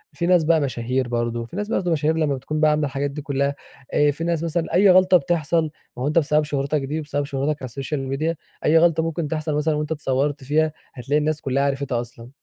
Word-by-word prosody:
في 170 - -1
ناس 175 -2 +4
بقى 160 0 +3
مشاهير 125 -1 -1
برضو، 120 -1 -2
في 120 - -12
ناس 205 +1 -2
برضو 180 -6 0
مشاهير 160 0 +1
لمّا 150 -3 +1
بتكون 150 +4 -4
بقى 155 -1 +4
عاملة 150 0 +1
الحاجات 140 +1 -2
دي 150 +1 -6
كلّها 140 -1 -1 0.4
آآ، 145 0 +4
في 160 +4 -6
ناس 170 -1 0
مثلًا 165 0 -2
أي 195 +3 +5
غلطة 185 0 +6
بتحصل 170 -2 0 0.3
ما 125 - -3
هو - - 0
أنت 155 +3 +3
بسبب 150 0 +2
شهرتك 145 0 -1
دي، 150 +4 -3
بسبب 145 -1 -2
شهرتك 140 +2 -2
على - - -4
السوشيال 135 +3 -4
ميديا 155 +5 -1 0.3
أي 160 - +5
غلطة 165 -1 +4
ممكن 165 -1 -2
تحصل 155 0 -2
مثلًا 150 +1 +1
وأنت 150 +1 -3
اتصورت 145 -1 -1
فيها، 155 +3 +1 0.2
هتلاقي 135 +3 -1
الناس 150 0 -1
كلّها 135 +1 0
عرفتها 135 -3 -1
أصلًا. 120 0 -11
150 Hz, 225 wpm, -22 LUFS, 135-160 Hz, 0.4 s, غلطة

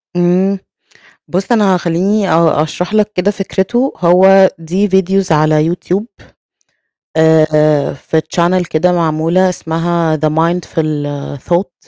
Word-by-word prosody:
امم، 180 +3 +1 0.7
بص 195 +6 -2
أنا 200 -5 +3
خليني 185 +4 -1
آه 160 -2 +2
أشرح 175 +6 -4
لك 210 0 +1
كده 185 +3 0
فكرته 210 +6 -2
هو 190 +2 +5
دي 185 +6 -1
فيديوز 190 -1 +1
على 155 0 +2
يوتيوب 180 +5 -2 1.1
آآ 155 -2 +2
في 160 +3 -2
channel 175 0 +1
كده 180 +3 +1
معمولة 170 +2 +1
اسمها 165 -1 -1
the 155 +1 0
mindful 165 +1 -1 0.7
thought. 180 +1 0
175 Hz, 115 wpm, -13 LUFS, 160-190 Hz, 1.1 s, هو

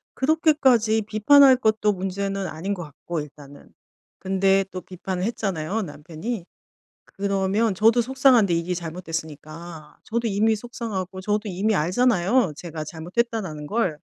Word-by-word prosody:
그렇게까지 265 -7 +3
비판할 260 +5 +6
것도 215 -3 +2
문제는 195 +1 -3
아닌 180 +6 -4
것 175 -3 -5
같고 155 +3 -6
일단은. 145 -1 -13 0.5
근데 195 +1 +2
또 185 - -6
비판을 185 0 -5
했잖아요, 200 -2 -2
남편이ㅡ 170 +6 -6 0.6
그러면 200 +2 0
저도 225 +4 +4
속상한데 250 -6 +4
이게 170 +2 -1
잘못됐으니까. 160 -2 -7
저도 235 +1 -2
이미 215 +2 +2
속상하고 205 -5 -5
저도 210 +1 -1
이미 200 +4 0
알잖아요, 190 +2 +2
제가 160 -3 -6
잘못했다라는 175 -1 -3
걸. 200 -8 0
195 Hz, 325 characters per minute, -24 LUFS, 170-225 Hz, 0.6 s, 비판할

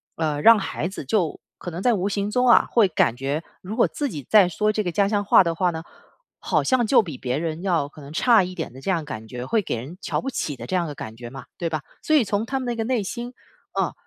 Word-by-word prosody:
呃， 155 -3 -1
让 230 +4 +8
孩 175 -4 -3
子 190 - -7
就 165 +3 -1 0.2
可 175 - -7
能 170 +3 -5
在 245 +1 +3
无 195 -1 0
形 205 0 -2
中 250 +2 +2
啊， - - +6
会 225 -5 +5
感 125 -8 +1
觉 140 +5 -2 0.2
如 195 +4 -6
果 235 - +4
自 290 - -2
己 150 - -7
再 205 -4 +7
说 210 +5 0
这 215 0 -1
个 175 -4 -3
家 200 -1 +2
乡 205 -1 0
话 195 - +6
的 170 - -1
话 180 0 +1
呢， 160 -1 -6 0.6
好 - - 0
像 250 -4 +2
就 260 - +6
比 160 - -7
别 125 +1 -2
人 165 +1 -3
要 170 -7 0
可 150 - -16
能 140 +1 -10
差 215 +2 +4
一 185 0 -7
点 - - -4
的 130 - -12
这 165 - -5
样 170 -4 +1
感 110 -7 -7
觉， 125 +2 -6
会 220 - +1
给 175 - -3
人 135 +10 -8
瞧 - - -2
不 270 - -3
起 150 - -3
的 - - -8
这 - - -6
样 170 -2 -1
的 145 - -6
感 110 -3 -8
觉 120 -1 -8
嘛， 135 +1 -10
对 170 - -2
吧？ 155 -2 -2 0.2
所 310 - +2
以 285 - +5
从 205 +1 -1
他 265 +2 -2
们 - - -5
那 240 -1 -2
个 225 - -1
内 240 -4 0
心， 240 +5 -6 0.4
嗯， - - 0
180 Hz, 305 characters per minute, -23 LUFS, 150-220 Hz, 0.6 s, 让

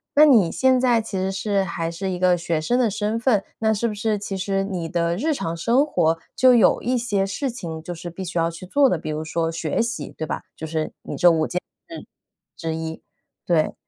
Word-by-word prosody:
那 300 - +8
你 220 - +5
现 260 -1 +3
在 240 -3 +3
其 205 -3 -5
实 190 +1 0
是 195 0 0
还 170 -2 -3
是 190 +3 -4
一 180 - -2
个 180 -1 +4
学 165 -2 -1
生 245 +10 +1
的 235 -3 +3
身 210 +3 -1
份。 230 -5 +2 0.2
那 220 0 +2
是 215 +3 -1
不 - - -4
是 210 0 -1
其 195 -1 -5
实 195 +1 -1
你 180 -4 -3
的 170 +1 0
日 310 +6 0
常 165 -10 -3
生 240 - +3
活， 165 - +1 0.2
就 255 -1 +6
有 230 - +4
一 250 +1 0
些 205 -5 0
事 255 +7 -2
情 165 -9 -6
就 175 - -5
是 175 +1 -7
必 190 +3 -7
须 175 -1 -5
要 165 0 +2
去 170 +2 -9
做 280 +8 +4
的， 175 - +1
比 155 - -6
如 155 +1 -3
说 165 +1 -1
学 160 +3 -1
习， 235 +1 -3
对 155 - -3
吧？ - - -4
就 160 - -6
是 155 0 -3
你 - - -6
这 175 - +6
5 160 -2 +2
件 180 - -2 0.3
事 330 - -8 0.5
之 165 -1 -3
一， 160 0 -5 0.5
对。 165 -3 +2
190 Hz, 250 characters per minute, -23 LUFS, 165-230 Hz, 0.5 s, 那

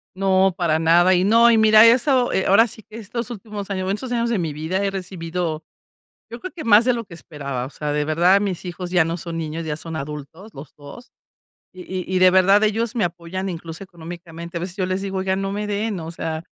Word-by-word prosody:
No, 190 0 +2
para 165 -4 +1
nada. 170 +3 +4
Y 180 0 +2
no, 230 +4 +5
y 230 - +4
mira 220 0 +7
eso, 250 +2 +4 0.2
ahora 225 +5 +5
sí 220 - -9
que 215 - -12
estos 235 +2 -5
últimos 210 -3 -7
años, 190 -2 -2
bueno 190 +1 0
estos 250 +3 -7
años 235 -1 0
de 230 -4 0
mi 160 -4 -2
vida 160 +6 -2
he 200 - +1
recibido, 175 -4 -4 0.7
yo 235 - -8
creo 370 - -7
que 325 - -7
más 225 0 +6
de 250 - +3
lo 235 -1 -4
que 180 - -13
esperaba. 140 -6 -6
O 130 - -8
sea, 150 0 -4
de 150 0 0
verdad, 175 +6 +3
mis 195 -4 -3
hijos 180 0 -6
ya 175 -2 +3
no 165 +1 -3
son 170 -1 -6
niños, 160 +1 -4
ya 150 -2 -3
son 165 +1 -7
adultos 150 +7 -8
los 140 +1 -12
2. 145 - -13 0.6
Y 185 0 -10
y 185 0 -4
y - - +3
de 185 0 +7
verdad, 195 +3 +5
ellos 225 +2 0
me 225 - +1
apoyan 175 +2 -4
incluso 165 0 -7
económicamente. 170 -1 -9
A - - -3
veces 180 +1 -6
yo 190 - -1
les 185 +1 -2
digo: 195 -1 -4
"Oiga, 190 0 0
no 195 0 -3
me 210 +1 -3
den". 205 -1 -2
O 160 0 -7
sea, 160 -1 -5
185 Hz, 240 wpm, -21 LUFS, 165-210 Hz, 0.7 s, mira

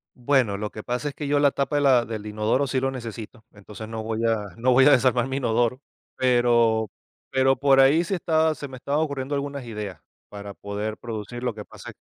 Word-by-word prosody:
Bueno, 125 -5 +1
lo 105 +1 -4
que 105 - -8
pasa 125 +4 -2
es 140 - -11
que 145 - -5
yo 145 0 +2
la 145 -1 +4
tapa 140 +2 -2
de 145 - +2
la 130 -4 +4
del 110 -2 -6
inodoro 110 +6 0
sí 130 -1 -1
lo 135 +1 0
necesito, 115 -2 -8
entonces, 105 +1 -10
no 110 0 -5
voy 115 +1 -2
a 110 -2 0
no 125 +3 +2
voy 130 +1 +6
a 145 - +7
desarmar 125 -2 +3
mi 135 0 -3
inodoro, 120 +1 0 0.3
pero 120 -3 +2 0.4
pero 130 0 +3
por 135 0 +4
ahí 140 +6 +5
se 190 - -2
está 160 -2 +1
se 145 - -7
me 130 - -10
estaban 140 +4 -1
ocurriendo 140 -2 -2
algunas 140 -1 -4
ideas 105 -6 -6 0.3
para 100 -1 -8
poder 105 +2 -5
producir. 115 +1 -7
Lo 125 -3 -1
que 105 -1 -9
pasa - - -11
es - - -10
125 Hz, 225 wpm, -24 LUFS, 110-140 Hz, 0.4 s, a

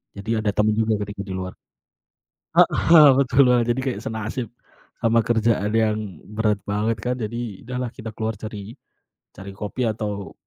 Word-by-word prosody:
Jadi 100 +2 -8
ada 110 -1 0
temen 105 +1 +2
juga 110 -1 +2
ketika 100 0 -6
di 95 - -6
luar. 95 0 -5 1.0
Heeh, 155 -3 +7
betul 135 0 +4
Wah, 125 -1 +4
jadi 120 +2 0
kayak 130 -1 -2
senasib 110 +2 -4 0.5
sama 115 0 +3
kerjaan 110 -3 +1
yang 110 -1 +2 0.3
berat 105 -1 0
banget 105 +2 0
kan. 125 +4 -1
Jadi, 115 -3 -5
udahlah 125 0 -3
kita 115 -3 -7
keluar 110 0 -3
cari 105 +1 -8 0.6
cari 95 +1 -9
kopi 105 +5 -5
atau 105 -2 -4
110 Hz, 155 wpm, -23 LUFS, 105-120 Hz, 1.0 s, Heeh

